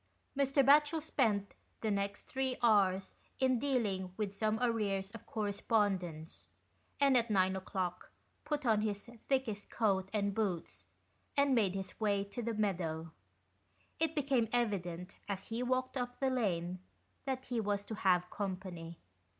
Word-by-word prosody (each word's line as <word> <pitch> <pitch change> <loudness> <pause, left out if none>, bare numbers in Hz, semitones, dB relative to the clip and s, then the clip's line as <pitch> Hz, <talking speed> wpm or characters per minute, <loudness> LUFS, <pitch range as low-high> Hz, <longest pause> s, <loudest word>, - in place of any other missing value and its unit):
Mr. 275 0 +3
Batchel 295 +3 +6
spent 220 -10 +1 0.3
the 220 - 0
next 200 0 -1
three 265 -1 -2
hours 195 -4 +4 0.3
in 260 -2 +3
dealing 210 -9 0
with 205 -2 -2
some 215 +1 +1
arrears 205 -5 0
of 230 0 -11
correspondence, 200 -6 -1 0.5
and 275 -2 +5
at 235 -1 +3
nine 190 -2 +3
o'clock 185 -2 -3 0.3
put 295 -2 -2
on 220 -3 +4
his 205 0 -2 0.2
thickest 250 -7 0
coat 195 -4 +1
and 200 -2 0
boots, 195 -6 -2 0.5
and 280 -1 +4
made 205 -6 +3
his 190 -1 -5
way 205 -2 +2
to 200 +5 -6
the 230 -1 -2
meadow. 165 -6 -1 0.9
It 325 0 +1
became 265 -6 +2
evident, 190 -6 -1
as 195 -1 -4
he 230 +2 -2
walked 255 +1 0
up 245 -1 -3
the 270 -1 +2
lane, 185 -7 0 0.5
that 265 -1 -2
he 245 -2 -1
was 205 -1 -1
to 220 - -5
have 180 -4 +3
company. 185 -4 -5
210 Hz, 145 wpm, -34 LUFS, 190-250 Hz, 0.9 s, Batchel